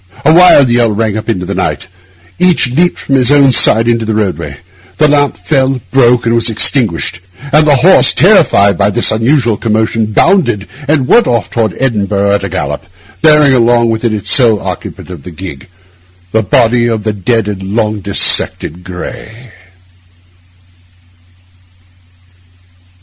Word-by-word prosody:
A 155 - +4
wild 170 -6 +5
yell 120 -1 +1
rang 105 0 -2
up 110 +1 -6
into 90 -5 -3
the 100 - -5
night; 95 0 -4 0.5
each 175 -8 +1
leaped 175 +7 0
from 140 - -5
his 130 -1 +2
own 140 -2 +4
side 115 -1 +4
into 115 -1 0
the 110 0 -3
roadway: 105 -4 -4 0.4
the 150 - +3
lamp 145 -1 0
fell, 135 -3 -1
broke, 125 -2 +2
and 115 - 0
was 115 0 +1
extinguished; 110 - 0 0.3
and 150 +1 +3
the 145 - +4
horse, 130 - +4
terrified 100 -2 +2
by 100 0 +1
this 105 - +2
unusual 115 0 0
commotion, 110 0 -2
bounded 120 - 0 0.2
and 145 -3 0
went 240 - +3
off 120 -1 -2
toward 110 -5 -2
Edinburgh 100 -5 -1
at 100 -1 -1
a 100 - -4
gallop, 75 -3 -5 0.3
bearing 150 -3 +4
along 120 -1 +1
with 110 +1 -4
it, 110 -4 -3
sole 115 -6 +3
occupant 90 0 -8
of 85 -5 -10
the 80 - -11
gig, 80 -5 -10 0.6
the 110 - 0
body 120 +3 +1
of 110 -3 -3
the 110 0 -2
dead 110 +2 -2
and 100 -2 -5
long 105 +2 -3
dissected 95 -3 0
Gray. 110 +6 -10
115 Hz, 155 wpm, -10 LUFS, 100-130 Hz, 0.6 s, wild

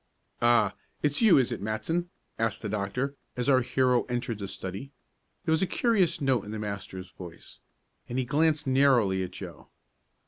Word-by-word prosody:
"Ah, 115 -4 +4 0.3
it's 145 +4 +1
you 220 -5 +7
is 130 -3 +2
it, - - -4
Matson?" 160 - -2 0.3
asked 115 -1 -1
the 105 - -2
doctor, 110 +7 -2 0.2
as 125 - -1
our 130 -2 +5
hero 125 0 +2
entered 120 -3 -3
the 100 - -4
study. 95 +7 -6 0.5
There 160 - +1
was 160 - +3
a 190 - +2
curious 190 -9 +2
note 135 -7 +1
in 105 - -9
the 110 - -4
master's 95 -3 -6
voice, 85 -3 -11 0.5
and 120 - -3
he 130 - 0
glanced 155 +3 +2
narrowly 130 -8 +3
at 90 - -3
Joe. - - -10
125 Hz, 175 wpm, -28 LUFS, 105-140 Hz, 0.5 s, you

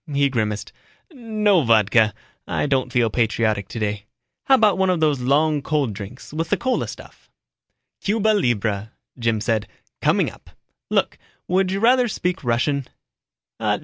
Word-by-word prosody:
He 140 0 +2
grimaced, 110 -5 -2 0.4
"No 215 - +1
vodka, 110 -3 +3 0.3
I - - -1
don't 130 -3 0
feel 120 -3 +2
patriotic 110 -3 0
today. 105 -2 -3 0.4
How 270 - +6
about 210 -6 +3
one 190 0 +2
of 180 -2 +1
those 150 -4 +2
long 145 +4 +2
cold 140 -6 -1
drinks, 105 +8 -9
with 165 +2 -2
the - - +2
cola 260 -1 -1
stuff?" - - -12 0.7
"Cuba 220 +1 +1
libra," 110 - 0 0.3
Jim 115 -2 +1
said. 110 -1 0 0.3
"Coming - - +2
up. - - -18 0.4
Look, - - 0 0.3
would 185 +1 +2
you 195 +1 -1
rather 245 +3 +4
speak 180 -5 -2
Russian?" 125 +3 0
135 Hz, 145 wpm, -22 LUFS, 110-185 Hz, 0.7 s, How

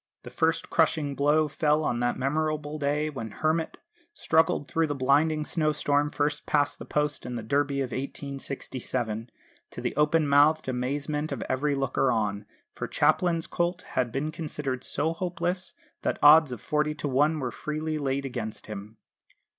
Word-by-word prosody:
The - - -9
first - - 0
crushing 145 -3 +2
blow 150 +2 +3
fell 150 +1 +1
on 120 -4 0
that 120 0 0
memorable 150 +2 -1
day 150 +1 0
when 115 -6 -5
Hermit 155 +8 -1 0.4
struggled 160 - +2
through 165 -1 0
a 145 - -1
blinding 150 +4 +2
snowstorm 150 -3 +1
first 145 0 -1
past 145 -1 +1
the - - -7
post 150 0 -1
in 125 - -5
the 115 - -4
Derby 140 +3 +1
of 130 -2 -3
1867, 130 -4 -4 0.4
to - - -9
the - - -3
open 150 +1 +3
mouthed 145 +2 +4
amazement 145 +4 -2
of - - -3
every 140 +2 0
looker 135 -1 +1
on; 105 -3 -1 0.3
for - - -4
Mr - - -24
Chaplin's 170 -2 +2
colt 175 +1 -1
had 125 -2 0
been 145 +5 -2
considered 150 -5 -4
so 160 +2 -1
hopeless 180 +1 -3 0.3
that - - -1
odds 150 -1 +8
of 120 - -6
forty 150 0 0
to 145 0 -3
one 145 +4 +2
were 130 -3 -2
freely 155 0 -3
laid 140 -1 -1
against 120 -5 -5
him. 105 +1 -8
145 Hz, 165 wpm, -27 LUFS, 130-155 Hz, 0.4 s, odds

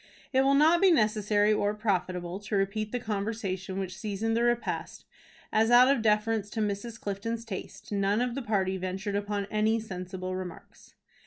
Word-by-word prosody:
It 260 - +5
will 275 +1 +4
not 320 +5 +5
be 390 - +6
necessary 210 - +3
or 205 0 0
profitable 185 -4 -2
to 205 +1 -4
repeat 200 +2 -1
the 245 - -1
conversation 200 -3 -3
which 185 -1 -4
seasoned 215 +2 -2
the 230 - +2
repast, 240 0 -1 0.5
as, 220 +1 +3
out 245 +2 +7
of 235 - -3
deference 215 -1 +1
to 220 - -5
Mrs. 215 +2 -3
Clifton's 225 +3 -4
taste, 195 -1 -8
none 200 +1 +1
of 245 0 0
the 275 - -3
party 195 -5 0
ventured 190 +2 -3
upon 205 0 -2
any 215 +1 +2
sensible 185 -3 -5
remarks. 185 -2 -9
210 Hz, 170 wpm, -29 LUFS, 195-225 Hz, 0.5 s, out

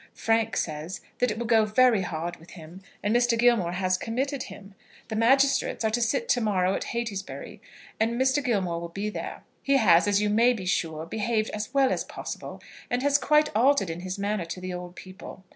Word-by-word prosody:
Frank 225 0 +1
says 155 +3 -4 0.2
that 250 - +2
it 210 - -3
will 235 - -3
go 225 -1 +4
very 220 0 +3
hard 170 -1 -4
with 165 - -17
him, 170 +2 -12 0.2
and 210 +3 +1
Mr. 240 -1 +3
Gilmore 225 -7 +3
has 185 0 0
committed 265 +4 -2
him. 195 0 -10 0.4
The 220 - -3
magistrates 270 +1 +2
are 220 - +2
to 240 +2 0
sit 355 - 0
to 245 - +3
morrow 190 -4 +1
at - - -3
Heytesbury, 220 -5 -5 0.4
and 230 +2 0
Mr. 265 +2 +2
Gilmore 190 -9 -1
will 170 - -6
be 200 +4 -4
there. - - -6 0.2
He 275 0 +3
has, 185 -6 +5
as 205 -1 +3
you 210 0 +1
may 235 +4 +4
be 200 -6 -6
sure, 165 -4 -1
behaved 220 +3 -1
as 210 +3 -5
well 275 -1 +3
as - - -1
possible, - - -7 0.3
and 245 +1 -1
has 285 0 +3
quite 300 +1 +2
altered 245 -5 +3
in 165 - -6
his 185 +2 -5
manner 200 -2 -2
to 170 +2 -6
the 185 0 -5
old 180 0 -7
people. 185 0 -11
215 Hz, 210 wpm, -26 LUFS, 185-240 Hz, 0.4 s, has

